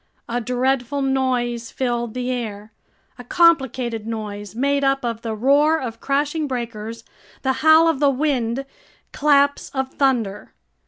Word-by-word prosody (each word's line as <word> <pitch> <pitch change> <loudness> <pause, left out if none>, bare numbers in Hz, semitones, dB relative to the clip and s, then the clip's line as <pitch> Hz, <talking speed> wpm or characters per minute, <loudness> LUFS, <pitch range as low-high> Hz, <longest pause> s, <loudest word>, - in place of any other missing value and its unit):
A 240 +1 -2
dreadful 255 +3 0
noise 250 -3 -1
filled 240 -3 -2
the 250 0 -2
air, 215 -4 -5 0.5
a - - -8
complicated 260 - +2
noise 210 -2 -6
made 280 +3 +1
up 270 -1 +1
of 230 -1 -3
the 225 -2 -4
roar 290 +7 +3
of 230 -4 -6
crashing 290 +2 0
breakers, 230 -3 -5 0.4
the 265 -1 +2
howl 315 +1 +6
of 320 -5 +1
the 285 -1 +4
wind, 270 -3 -1 0.5
claps 285 -1 +2
of 265 0 -2
thunder. 240 -8 0
255 Hz, 140 wpm, -21 LUFS, 230-280 Hz, 0.5 s, howl